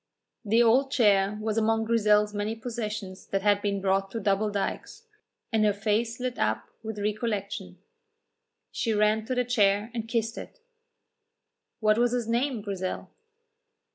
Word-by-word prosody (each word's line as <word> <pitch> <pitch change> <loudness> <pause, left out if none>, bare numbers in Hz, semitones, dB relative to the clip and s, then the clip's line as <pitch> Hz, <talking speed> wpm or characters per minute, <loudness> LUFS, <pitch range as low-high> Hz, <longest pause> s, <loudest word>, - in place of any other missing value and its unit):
The 225 +2 +4
old 255 +4 +4
chair 205 -6 +3
was 215 +1 0
among 225 0 +2
Grizel's 210 -2 +3
many 210 +2 -2
possessions 215 -5 -5
that 195 -1 -2
had 205 -1 +3
been 200 -1 -1
brought 195 0 +1
to 225 - -4
Double 205 +1 +1
Dykes, 205 - -4 0.5
and 220 -1 +3
her 210 -1 +3
face 220 +3 -1
lit 250 -1 -3
up 110 0 0
with 220 -1 -6
recollection. 210 -1 -3 0.9
She 230 -3 -1
ran 215 +1 +2
to 255 +2 -2
the 250 0 +1
chair 210 -2 +2
and 225 -2 -4
kissed 230 0 -1
it. - - -11 1.2
"What 215 +1 +3
was 240 0 +2
his 240 -2 -1
name, 235 -1 0
Grizel?" 190 -3 -4
215 Hz, 150 wpm, -27 LUFS, 205-230 Hz, 1.2 s, The